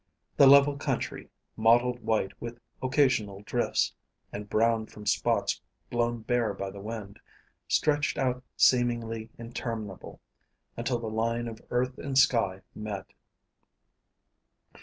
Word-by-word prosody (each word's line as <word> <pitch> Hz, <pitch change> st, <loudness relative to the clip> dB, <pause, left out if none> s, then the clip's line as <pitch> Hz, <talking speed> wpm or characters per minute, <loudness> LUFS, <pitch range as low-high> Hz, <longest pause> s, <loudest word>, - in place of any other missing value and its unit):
The 140 Hz, -, +7 dB
level 140 Hz, +1 st, +7 dB
country, -, -, -3 dB, 0.3 s
mottled 120 Hz, +2 st, +4 dB
white 110 Hz, -4 st, 0 dB
with 120 Hz, 0 st, -6 dB, 0.2 s
occasional 125 Hz, -7 st, +1 dB
drifts, -, -, 0 dB, 0.4 s
and 105 Hz, 0 st, -6 dB
brown 115 Hz, 0 st, +2 dB
from 105 Hz, 0 st, -12 dB
spots -, -, +1 dB, 0.3 s
blown 120 Hz, -1 st, 0 dB
bare 120 Hz, -4 st, 0 dB
by 100 Hz, 0 st, -4 dB
the 100 Hz, 0 st, -9 dB
wind, 105 Hz, -1 st, -7 dB, 0.5 s
stretched 145 Hz, 0 st, +1 dB
out 125 Hz, -1 st, 0 dB
seemingly 115 Hz, -3 st, +2 dB
interminable, 115 Hz, -4 st, -6 dB, 0.6 s
until 120 Hz, +1 st, -1 dB
the 115 Hz, -, -6 dB
line 115 Hz, +2 st, -1 dB
of 115 Hz, -1 st, -8 dB
earth 125 Hz, +1 st, -1 dB
and 135 Hz, -2 st, -2 dB
sky 100 Hz, -8 st, +3 dB
met. 105 Hz, -3 st, -6 dB
115 Hz, 115 wpm, -28 LUFS, 110-125 Hz, 0.6 s, The